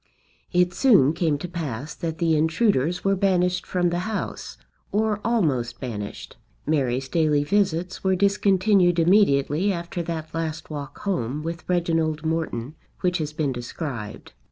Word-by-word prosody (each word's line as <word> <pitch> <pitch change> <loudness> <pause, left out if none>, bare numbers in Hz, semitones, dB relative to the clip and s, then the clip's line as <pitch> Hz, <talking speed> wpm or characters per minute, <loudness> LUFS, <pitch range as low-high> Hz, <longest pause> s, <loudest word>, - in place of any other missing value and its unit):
It 180 0 +2
soon 175 - +5
came 160 -4 +1
to 160 - -6
pass 150 -5 -5
that 165 -3 -4
the 165 -1 +2
intruders 160 - +1
were 195 0 +2
banished 180 -2 +1
from 175 -1 +1
the 175 - -1
house, 210 +4 -4 0.3
or 210 0 +1
almost 135 - 0
banished. 105 -6 -6 0.3
Mary's 135 -4 0
daily 150 -1 +2
visits 185 0 0
were 190 -1 +3
discontinued 195 -2 +3
immediately 170 -1 +3
after 170 -1 -4
that 160 -2 -5
last 160 -1 -4
walk 145 -1 -6
home 150 - -2
with 165 +1 -6
Reginald 165 -3 0
Morton 155 -5 -2 0.3
which 180 -1 +1
has 155 -1 -2
been 150 -3 -1
described. 120 -3 -6
165 Hz, 140 wpm, -24 LUFS, 145-180 Hz, 0.3 s, soon